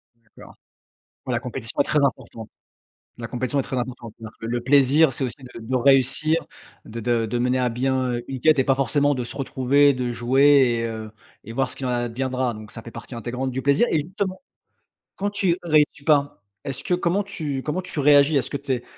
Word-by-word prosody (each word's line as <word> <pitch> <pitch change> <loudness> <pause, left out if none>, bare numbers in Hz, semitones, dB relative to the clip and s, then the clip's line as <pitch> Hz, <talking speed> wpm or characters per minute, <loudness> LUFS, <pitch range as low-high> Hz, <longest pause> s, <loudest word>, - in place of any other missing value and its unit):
D'accord. 115 -2 -17 0.7
La 120 -2 -1
compétition 125 -2 -5
est - - +5
très 150 +1 +1
importante. 115 -4 -4 0.7
La 115 - -5
compétition 130 +3 -2
est - - -1
très 130 - -5
importante. 120 -2 -5
C'est-à-dire 110 -1 -10
que 115 - -5
le 120 +1 -2
plaisir, 140 +3 +4
c'est 130 - -3
aussi 125 - -4 0.2
de - - -8
de 120 +3 -2
réussir, 135 +5 +3 0.4
de 115 +2 -7
de 115 0 0
de 120 +2 -2
mener 125 +1 +1
à 125 -1 +1
bien 130 0 -1
une 135 -2 -6
quête 155 +2 +4
et 135 - +3
pas 135 - +3
forcément 145 +2 +1
de 125 - -3
se - - -9
retrouver, 140 +1 +3
de 125 -2 -3
jouer 130 +1 +4
et - - -2
heu, 110 -1 -6 0.3
et 115 - -8
voir 135 +2 0
ce - - -6
qu'il 135 - -6
en - - -1
adviendra. 125 +1 -2
Donc, 105 -1 -11
ça - - -8
fait 115 - -10
partie 125 - -10
intégrante 125 +3 -4
du 130 +1 -3
plaisir. 140 +11 +3
Et 155 - +2
justement, 185 +4 -4 0.8
quand 200 +1 -1
tu 190 -4 +1
réussis 150 -3 +2
pas, 145 -8 +2 0.2
est-ce 135 -2 -5
que - - -1
comment 180 +3 +1
tu 150 -9 -4
comment 155 +7 -2
tu 180 -4 -6
réagis? 145 +1 +5
Est-ce 135 - -1
que 140 - -3
tu 140 -1 -5
es 120 -1 -3
130 Hz, 215 wpm, -23 LUFS, 120-145 Hz, 0.8 s, est